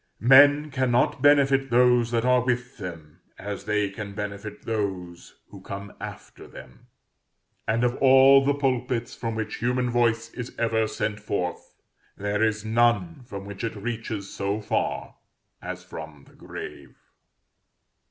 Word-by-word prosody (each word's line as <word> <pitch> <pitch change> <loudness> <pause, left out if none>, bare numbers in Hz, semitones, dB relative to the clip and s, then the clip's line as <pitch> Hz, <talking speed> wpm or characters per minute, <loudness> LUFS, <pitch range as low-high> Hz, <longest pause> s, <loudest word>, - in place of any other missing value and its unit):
Men 145 +5 +6
cannot 130 0 +1
benefit 135 -2 +4
those 120 -1 +4
that 115 0 0
are 125 -1 +4
with 125 +1 -2
them 85 -5 -9 0.2
as 100 -1 -6
they 105 -1 +1
can 100 0 -7
benefit 105 +1 -6
those 95 -6 -4
who - - -12
come 100 0 -8
after - - -9
them; - - -14 0.8
and 115 +3 +1
of 125 0 +1
all 135 +1 +7
the 140 +1 +2
pulpits 125 -3 -1
from 115 -1 -4
which 110 -1 -4
human 125 +1 0
voice 115 -1 +1
is 125 -1 -7
ever 110 -1 +1
sent 110 -1 -3
forth, 100 -4 -4 0.4
there 100 +1 -2
is 110 -1 0
none 120 +8 +1
from 100 -3 -7
which 100 +1 -8
it 115 -1 -3
reaches 110 -2 -5
so 100 +2 -2
far 105 - -2 0.4
as - - -6
from 80 -3 -10
the - - -20
grave. - - -9
115 Hz, 140 wpm, -25 LUFS, 100-125 Hz, 0.8 s, all